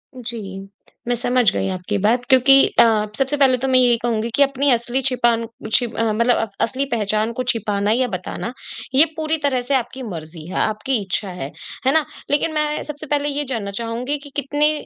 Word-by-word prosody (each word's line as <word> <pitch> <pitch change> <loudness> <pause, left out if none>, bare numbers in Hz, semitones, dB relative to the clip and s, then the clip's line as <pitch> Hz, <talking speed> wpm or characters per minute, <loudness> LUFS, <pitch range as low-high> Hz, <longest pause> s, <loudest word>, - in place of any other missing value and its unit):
जी, 210 -6 -6 0.4
मैं 245 - +1
समझ 245 -3 +2
गई - - -1
आपकी 185 +3 -3
बात 240 +3 +2
क्योंकि 265 +1 +6 0.2
अ, - - +10 0.3
सबसे 270 +2 +1
पहले 265 -2 +4
तो 265 +2 -2
मैं 255 -1 +5
यही 240 -2 +4
कहूँगी 230 -1 0
कि 280 - +5
अपनी 275 +1 +1
असली 240 +2 +1
छिपान 235 -2 +1 0.3
छि 245 - +4
अ, 225 -1 -1
मतलब 235 +2 +3
अब 225 - -1
असली 265 +4 0
पहचान 215 0 0
को 255 - -3
छिपाना 205 -2 -1
या 250 +2 +2
बताना, 190 +5 -5 0.4
ये 300 +4 +7
पूरी 315 0 0
तरह 260 -3 +1
से 275 +3 -3
आपकी 260 +1 -2
मर्ज़ी 160 -5 -8
है, 185 - -7
आपकी 220 +4 0
इच्छा 195 +1 -2
है। 175 -6 -6 0.3
है 265 - +4
ना? 315 -2 +3 0.3
लेकिन 305 +2 +1
मैं 300 0 -1
सबसे 300 0 -8
पहले 290 0 0
ये 290 +1 -2
जानना 210 -5 -3
चाहूँगी 245 +5 -2
कि 285 - -10
कितने 290 +2 +1
245 Hz, 200 wpm, -20 LUFS, 215-275 Hz, 0.4 s, अ